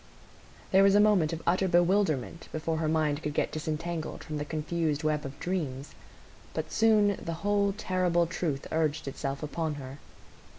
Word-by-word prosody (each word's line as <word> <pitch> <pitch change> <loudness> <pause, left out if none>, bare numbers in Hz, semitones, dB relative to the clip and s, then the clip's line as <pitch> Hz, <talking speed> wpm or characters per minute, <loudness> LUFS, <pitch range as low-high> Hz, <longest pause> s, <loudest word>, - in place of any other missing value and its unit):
There 190 - +6
was 195 0 +5
a - - +6
moment 205 -7 +4
of 165 -1 -5
utter 185 +2 +2
bewilderment 175 -4 +1
before 160 +1 -2
her 160 -1 0
mind 155 -1 +1
could 150 -1 -4
get - - 0
disentangled 160 +1 -4
from 155 -2 -5
the 145 - -3
confused 155 0 -1
web 155 -1 0
of 140 +1 -8
dreams; 150 -7 -3 0.6
but - - -3
soon 210 -3 +3
the 165 - -3
whole 205 -1 +3
terrible 180 -4 +1
truth 160 -4 -3
urged 155 -2 0
itself 135 +1 -4
upon 155 +1 -2
her. 135 0 -8
160 Hz, 165 wpm, -29 LUFS, 150-185 Hz, 0.6 s, There